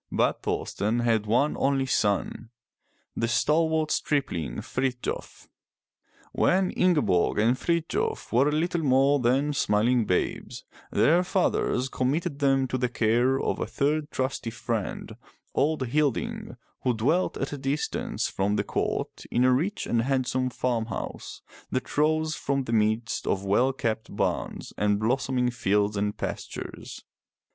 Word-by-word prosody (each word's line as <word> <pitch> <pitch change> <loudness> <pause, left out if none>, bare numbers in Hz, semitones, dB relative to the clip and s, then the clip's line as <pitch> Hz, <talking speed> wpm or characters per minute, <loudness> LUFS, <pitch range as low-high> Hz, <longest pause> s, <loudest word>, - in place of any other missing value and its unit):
But - - +1
Thor'sten 110 +4 -1
had 115 -3 +1
one 125 +7 +2
only 135 -1 +1
son, 110 -1 0 0.7
the 115 - 0
stalwart 155 +7 +2
stripling 90 - -1
Frith'jof. 130 -1 -4 0.8
When 185 0 +2
Ingeborg 145 - +2
and 115 +4 +3
Frithjof 170 - -1
were 135 +5 +4
little 165 +3 0
more 140 0 +3
than 135 +4 +2
smiling 115 -1 +2
babes, 90 - -2 0.3
their 155 - +4
fathers 180 -8 +1
committed 140 +4 -1
them 135 -2 +2
to 130 - -1
the 125 0 0
care 120 +3 +2
of - - -1
a - - -2
third 150 +2 0
trusty 130 -4 -2
friend, 115 -3 -4 0.4
old 145 -4 0
Hil'ding, 145 -1 -1 0.2
who 125 -2 +1
dwelt 150 +12 +1
at 135 - -3
a - - -4
distance 135 +2 -2
from 100 +2 -1
the - - +1
court - - -3
in 120 - +2
a 130 0 +5
rich 180 +11 -1
and 115 - +1
handsome 130 0 0
farm 120 -3 -1
house - - -6 0.3
that 130 0 -3
rose 155 +1 +2
from 140 -3 -1
the 115 - -4
midst 110 +1 0
of 100 0 0
well 120 +7 +3
kept 115 -3 -3
barns - - -2
and 105 0 +2
blossoming 125 +2 +1
fields 105 -2 +1
and 105 +1 -1
pastures. - - -6
130 Hz, 135 wpm, -26 LUFS, 115-145 Hz, 0.8 s, a